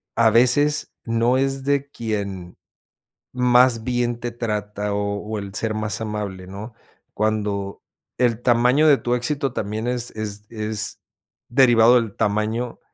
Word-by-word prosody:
a 115 -1 +4
veces, 130 +6 +3
no 115 +2 +1
es 135 0 -1
de 140 0 0
quien 100 -7 -5 0.7
más 125 -2 +3
bien 120 -1 -1
te 120 0 -4
trata 105 -3 -3
o 100 0 -2
o 110 0 -5
el 100 -1 -7
ser 110 +1 0
más 110 +1 -2
amable, 105 -4 -5
¿no?, 105 +4 -8 0.4
cuando 105 -2 -2 0.4
el 120 -2 +1
tamaño 125 +5 +3
de 140 -3 +6
tu 120 - -2
éxito 135 +2 -1
también 110 +2 -3
es 125 -1 -2
es 105 -1 -6
es 110 -1 -2 0.5
derivado 120 -2 +5
del 115 -4 0
tamaño 110 +3 -1
115 Hz, 140 wpm, -22 LUFS, 105-125 Hz, 0.7 s, de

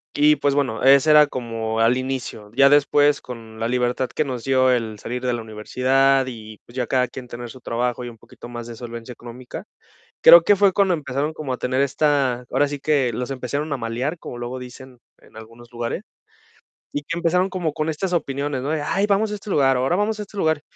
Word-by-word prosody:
Y 150 +1 +5
pues 140 0 0
bueno, 130 -6 -1
ese 140 +3 +6
era 150 0 +8
como 115 -4 -4
al 115 +2 +3
inicio. 130 -5 -5
Ya 140 +2 +6
después 145 0 +4
con 115 -3 -10
la 115 - -1
libertad 125 +1 0
que 155 - -1
nos 125 -4 -5
dio 130 -1 +3
el 110 -4 -1
salir 125 +3 -5
de 125 - +1
la 120 - -3
universidad 130 +5 +1
y 110 -3 -9
pues 120 - -16
ya 125 -2 -1
cada 125 0 +1
quien 125 +1 -9
tener 120 0 -8
su 130 +2 -12
trabajo 120 +1 -2
y 120 - -5
un 115 - -14
poquito 115 +1 -13
más 120 -1 -7
de 120 - -8
solvencia 120 +1 -8
económica, 120 +1 -10 0.6
creo 170 - +10
que 205 +3 +4
fue 200 0 +4
cuando 190 -1 +2
empezaron 145 0 -2
como 150 -4 -5
a 125 - -3
tener 130 +1 -1
esta 140 -3 +1
ahora 145 - +2
sí 145 0 -5
que 140 -5 +1
los 125 +4 -4
empezaron 140 +3 -3
a 140 - 0
malear, 125 +8 -3
como 120 - -8
luego 120 +1 -5
dicen 125 0 -11 0.2
en - - -21
algunos 115 +2 -13
lugares, 120 -1 -4 0.9
y 145 - -3
que 170 +3 -5
empezaron 180 +3 +1
como 175 -5 -2
con 155 +2 -2
estas 180 +4 -2
opiniones, 140 -4 -2
¿no? 145 - -3
De: 155 -2 -1
"Ay, 195 +7 0
vamos 210 +1 +1
a 210 - -3
este 200 0 -10
lugar, 135 -6 +3
ahora 130 +7 +1
vamos 210 +3 0
a - - -4
este 205 0 -12
lugar". 160 -5 +1
130 Hz, 225 wpm, -22 LUFS, 120-150 Hz, 0.9 s, creo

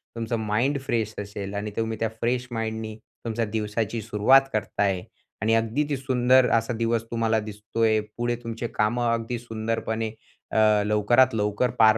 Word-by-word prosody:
तुमचा 115 0 -2
mind 115 +7 0
fresh 115 -5 -1
असेल 100 -1 -6
आणि 100 +1 -3
तुम्ही 115 -1 -1
त्या 115 - 0
फ्रेश 125 +2 0
माइंडनी 110 -1 -3 0.3
तुमच्या 115 0 -1
दिवसाची 110 +1 -2
सुरुवात 115 +5 +5
करता 110 -1 -1
आहे 95 -2 0 0.4
आणि 110 +1 +2
अगदी 115 +6 +1
ती 140 - 0
सुंदर 130 -1 +4
असा 115 +2 -1
दिवस 115 0 0
तुम्हाला 115 -1 +1
दिसतो 105 +1 -5
आहे. 110 -1 +4 0.2
पुढे 120 0 0
तुमची 115 +1 -4
कामं 120 +2 +1
अगदी 115 +1 -2
सुंदरपणे 110 -1 -2 0.4
अ, - - -1 0.3
लवकरात 115 +5 +4
लवकर 105 +3 +1
पार 110 0 +7
115 Hz, 160 wpm, -25 LUFS, 110-120 Hz, 0.4 s, पार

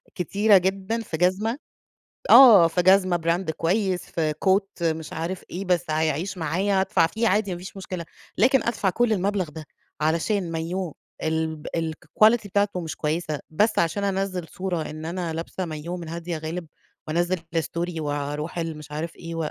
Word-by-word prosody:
كتيرة 200 +4 +4
جدًا 195 +4 -1
في 175 -7 -5
جزمة 190 - +1 0.7
آه، 215 -11 +9
في 175 +2 0
جزمة 185 -1 +5
براند 170 +1 0
كويس، 180 +3 0
في 155 -2 -1
Coat 195 -1 +1
مش 160 -1 -1
عارف 170 +3 -4
إيه، 190 +3 -4
بس 180 -2 +1
هيعيش 160 +4 -1
معايا، 185 +5 +1
أدفع 190 -3 +3
فيه 225 +6 0
عادي، 205 -1 +1
ما 175 - -4
فيش 185 +3 -10
مشكلة، 185 -3 -5 0.3
لكن 255 +4 +4
أدفع 215 -4 0
كل 240 +4 +1
المبلغ 195 -2 0
ده 155 +1 -9 0.4
علشان 170 +4 0
مايوه، 165 +1 -3 0.3
الب 160 -1 -2
الquality 215 +8 +2
بتاعته 200 -1 0
مش 160 -2 -5
كويسة، 155 -1 -2
بس 210 +8 +2
عشان 170 +4 +1
أنزّل 190 -3 -2
صورة 180 -4 -3
إن 155 +1 -7
أنا 170 0 -3
لابسة 165 +3 -4
مايوه 165 +1 -5
من 170 -2 -7
هادية 170 0 -4
غالب 160 +2 -5 0.4
وأنزّل 175 +3 +1 0.2
الstory 170 +1 -2
وأروح 145 +2 -3
ال 165 -2 -3
مش 150 -1 -11
عارف 160 +3 -4
إيه، 165 -2 -4
175 Hz, 165 wpm, -24 LUFS, 160-195 Hz, 0.7 s, آه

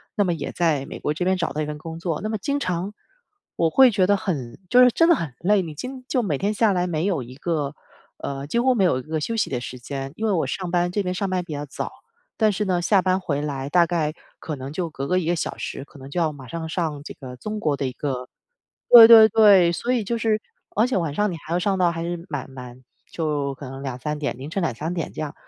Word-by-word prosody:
那 205 - +3
么 175 -2 0
也 165 - -5
在 155 -6 0
美 - - -7
国 150 - -1
这 180 - -3
边 185 +1 +2
找 170 -6 -2
到 155 - -2
一 150 - -2
份 150 0 -5
工 165 +2 -8
作， 165 -3 -2
那 215 - -3
么 220 - -1
经 285 +7 -1
常 185 -1 -2 0.6
我 165 -1 +3
会 260 +5 +6
觉 190 -3 +2
得 205 0 +4
很 140 -11 -4
就 250 0 +8
是 250 - +7
真 330 +7 +3
的 340 - +6
很 145 -7 -5
累。 200 +2 +3
你 160 -4 -7
今 255 - -7
就 250 -4 0
每 150 -9 -1
天 205 +2 0
下 215 -2 +3
来 180 0 0
没 165 +1 -1
有 175 -9 0
一 125 +2 -10
个 150 -2 -2 0.4
呃， 140 0 -5
几 235 - -2
乎 260 +1 +3
没 205 -5 +2
有 170 -8 +3
一 - - -8
个 155 -1 -3
休 230 +8 -2
息 220 - 0
的 125 -2 -2
时 125 - -7
间。 135 +2 -6
因 225 - -3
为 215 - +2
我 175 - +1
上 180 -2 -4
班 175 0 +2
这 205 +1 -1
边 180 0 -2
上 195 +1 -2
班 185 -1 -1
比 160 -3 -7
较 145 0 -4
早， - - -5 0.5
但 215 -2 +3
是 210 +1 -2
呢 180 -2 +1
下 190 +1 +3
班 185 0 +2
回 145 -6 -2
来 140 -2 -4
大 175 0 +5
概 160 -3 -1 0.3
可 155 - -5
能 135 +1 -7
就 170 -1 -2
隔 140 -2 -5
个 185 0 +2
1 165 - -3
个 175 - +2
小 - - -3
时， - - -5
可 145 - -16
能 135 +1 -10
就 175 - -2
要 160 -2 +1
马 135 -4 -11
上 165 +4 -5
上 160 -4 -3
这 - - -8
个 125 -2 -10
中 215 +9 -5
国 150 -6 0
的 140 - -2
一 130 - -2
个 125 -2 -4 0.6
对 230 -2 +12
对 225 -1 +9
对。 200 -6 +6
所 240 +8 -1
以 245 -3 +1
就 235 +3 -2
是 215 -1 +1 0.4
而 220 - +4
且 255 - 0
晚 165 -5 -1
上 210 +4 +1
你 - - -5
还 160 - -8
要 175 - +2
上 195 0 0
到 175 -2 +3
还 165 0 -4
是 170 0 -4
蛮 140 -4 -5
蛮， 125 -1 -10 0.3
就 145 -4 -2
可 135 -1 -9
能 135 +1 -8
2-3 135 +4 -4
点， 145 -4 -3
凌 140 +4 -7
晨 195 - -2
2-3 155 +3 -2
点 165 - -4
这 - - -7
样。 150 -2 -4
170 Hz, 290 characters per minute, -23 LUFS, 145-195 Hz, 0.6 s, 对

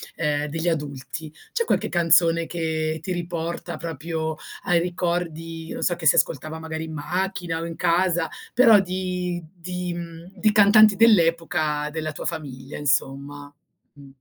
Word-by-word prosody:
ehm, 150 -2 0
degli 165 +3 -3
adulti, 150 -1 -4 0.2
c'è 465 -1 +1
qualche - - 0
canzone 170 -1 +3
che 160 -2 -2
ti 185 - -5
riporta 170 0 -4
proprio 160 0 -4 0.3
ai 175 -1 +3
ricordi, 170 -2 -3
non - - -4
so 175 - +2
che 165 -2 -1
si - - +6
ascoltava 155 +2 0
magari 160 0 -5
in 160 - -8
macchina 175 +1 -2
o - - -4
in 165 - -6
casa, 170 0 +2 0.3
però 230 -4 +7
di 180 -2 -2
di, 180 0 -5
mhmm, 170 +1 -8
di 215 - +4
cantanti 210 0 +7
dell'epoca 165 -7 +3
della 155 0 -3
tua - - -7
famiglia 140 -5 -5
insomma? 145 0 -1 0.4
Mh. 140 -2 -15
165 Hz, 150 wpm, -24 LUFS, 155-180 Hz, 0.4 s, però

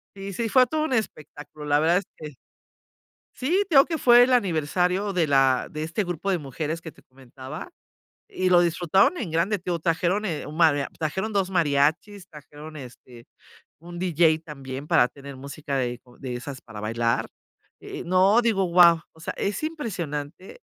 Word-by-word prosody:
Y 195 0 -7
sí, 230 +4 -2
fue 255 +3 +4
todo 310 +4 -1
un 310 - -2
espectáculo, 155 - -5
la 145 0 +2
verdad 165 +3 +3
es 195 - -2
que 150 -3 -10 1.0
Sí, 345 +10 +1
te 335 - -2
digo 275 - +8
que 325 -2 -3
fue 240 -2 +6
el 255 - +2
aniversario 180 -1 +1
de 180 -3 +1
la 135 -2 +3
de 155 - -5
este 165 +6 -2
grupo 175 +1 -4
de 185 - +2
mujeres 155 +3 -5
que 160 - -9
te - - -22
comentaba 130 - -11 0.6
y 185 0 -1
lo 175 -1 +6
disfrutaron 180 - +2
en 205 - -4
grande. 170 +6 +1
Te 180 -1 -5
digo, 170 - -1
trajeron, 175 +5 0
eh, 165 -7 -3
un 150 - -9
maria 155 -4 +3
trajeron 190 +8 -3
2 195 -2 0
mariachis, 165 +4 0
trajeron, 150 0 -12
este, 125 -2 -13 0.5
un 175 +2 -10
DJ 165 -3 +2
también 135 -2 -8
para 125 - +4
tener 140 +1 -11
música 140 +1 -6
de 125 -2 -2
como 125 -1 -20
de 130 -3 -6
esas 130 +2 -8
para 110 -3 -10
bailar, 115 +2 -1 0.5
eh - - -8
eh, - - -5
no 190 +5 +4
digo: 220 -5 +1
"Guau". 170 -2 +5
O 160 - -20
sea, 165 - -5
es 205 +7 -2
impresionante 185 - -5
165 Hz, 185 wpm, -24 LUFS, 145-195 Hz, 1.0 s, digo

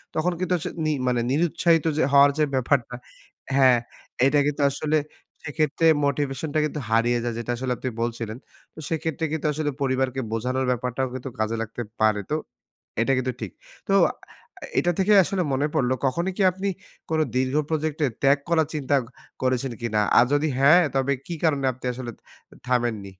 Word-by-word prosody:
তখন 165 +3 +1
কিন্তু 185 0 0
আস - - -8 0.2
নি 155 - +2 0.2
মানে 120 -1 +1
নিরুৎসাহিত 165 +1 +2
যে - - +3
হওয়ার 140 0 +7
যে 155 - +3
ব্যাপারটা 125 -1 0 0.6
হ্যাঁ। 130 -3 +5 0.5
এটা 145 +2 +4
কিন্তু 145 0 -1
আসলে 155 +2 0 0.5
সেক্ষেত্রে 155 +2 0 0.2
মোটিভেশনটা 145 +2 -1
কিন্তু 150 0 -4
হারিয়ে 120 +2 +2
যায়, 120 -2 -2
যেটা 120 +1 -3
আসলে 130 0 -3
আপনি 130 - -3
বলছিলেন। 115 -1 -3 0.4
তো - - -12
সেক্ষেত্রে 160 -1 -2
কিন্তু 160 -1 -3
আসলে 150 -1 -1
পরিবারকে 130 -1 0
বোঝানোর 130 +3 -1
ব্যাপারটাও 125 +1 -1
কিন্তু 130 +1 -5
কাজে 110 +1 0
লাগতে 115 +2 -5 0.2
পারে। 105 -1 +3
তো - - +2 0.7
এটা 135 - +1
কিন্তু 130 0 -1
ঠিক। - - -5 0.4
তো - - +3 0.2
আ - - -16 0.7
এটা 175 - +2
থেকে 205 +2 +4
আসলে 190 +1 -1
মনে 140 +3 +1
পড়ল, 130 -4 +1
কখনই 170 +8 0
কি - - 0
আপনি 195 +2 -3 0.4
কোনো 160 -1 +2
দীর্ঘ 130 +1 +1 0.2
প্রজেক্টে, 155 -1 0 0.2
ত্যাগ 140 +1 +5
করার 160 -3 +3
চিন্তা 145 -1 0 0.5
করেছেন 130 0 0
কিনা? 110 -2 0 0.2
আর 120 - +7
যদি 150 +2 +2
হ্যাঁ, 155 +6 +7
তবে 135 +1 +2
কি 170 - -4
কারণে 145 -4 +2
আপনি 130 +1 -12
আসলে 120 -1 -6 0.6
থামেননি? 120 -5 0
135 Hz, 170 wpm, -24 LUFS, 125-155 Hz, 0.7 s, হওয়ার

